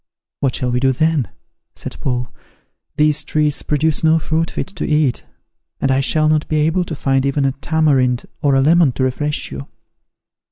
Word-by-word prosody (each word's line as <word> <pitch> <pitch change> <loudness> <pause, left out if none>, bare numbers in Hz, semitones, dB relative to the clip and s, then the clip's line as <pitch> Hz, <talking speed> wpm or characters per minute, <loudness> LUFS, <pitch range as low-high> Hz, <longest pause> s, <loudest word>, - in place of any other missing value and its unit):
" - - -74
"What 135 -3 0
shall 125 -1 -2
we 125 - +1
do 130 +1 +2
then," 155 -2 +1 0.5
said - - -7
Paul; 125 -1 -3 0.6
"these 150 0 +2
trees 150 -2 0
produce 150 +1 0
no 160 0 +4
fruit 160 +1 -1
fit - - -4
to 190 -4 -6
eat; 150 -4 +1 0.6
and 135 - +1
I 135 - +2
shall 155 +2 +1
not 155 0 +1
be 155 - -2
able 165 +4 +1
to 165 - -5
find 135 -1 0
even 140 0 0
a 135 - +2
tamarind 135 -4 +1 0.2
or 140 -2 +2
a 135 - +4
lemon 160 -1 +4
to 130 - -2
refresh 145 +3 -2
you." 70 0 -7
145 Hz, 190 wpm, -18 LUFS, 135-155 Hz, 0.6 s, no